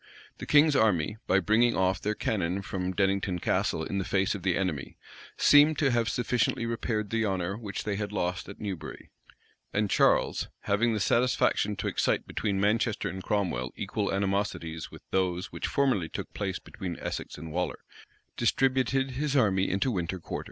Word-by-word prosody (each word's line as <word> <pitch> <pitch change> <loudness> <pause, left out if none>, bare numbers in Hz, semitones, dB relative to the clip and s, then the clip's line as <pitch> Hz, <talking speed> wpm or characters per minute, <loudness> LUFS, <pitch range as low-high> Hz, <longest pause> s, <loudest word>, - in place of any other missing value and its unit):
The - - -7
king's 150 0 +5
army, 105 - +2
by 95 - +4
bringing 110 +6 +3
off 95 +1 +1
their 105 +1 -1
cannon 95 -3 -1
from 95 -1 -3
Dennington 95 -1 0
Castle 80 - 0
in 100 +4 -2
the - - -1
face 95 +1 +1
of 100 - -5
the 90 -1 +1
enemy, 90 -8 -3 0.4
seemed 145 +1 +6
to 140 -3 +2
have 115 -2 +1
sufficiently 120 -1 0
repaired 115 -2 -2
the 115 0 +1
honor 95 -2 -1
which 105 -2 -5
they 105 -2 -2
had 105 -1 -3
lost 90 -2 -2
at 100 - -10
Newbury; 100 -6 -6 0.6
and 105 -1 0
Charles, - - +3
having 110 +3 +1
the - - -1
satisfaction 120 -1 +2
to - - -3
excite - - 0
between 100 -2 -2
Manchester 105 +1 +1
and 95 +2 -6
Cromwell 90 - -1
equal - - -2
animosities 95 -5 -2
with - - -13
those 90 0 0
which - - -3
formerly 125 - +1
took - - -6
place 95 -3 -2
between 95 -5 -7
Essex - - -5
and 80 +1 -8
Waller,[*] 85 -3 -3 0.5
distributed 130 +2 +1
his 145 +2 -2
army 100 -7 +3
into 100 +8 +1
winter 90 -3 -2
quarters. 80 - -5
100 Hz, 175 wpm, -28 LUFS, 95-115 Hz, 0.6 s, seemed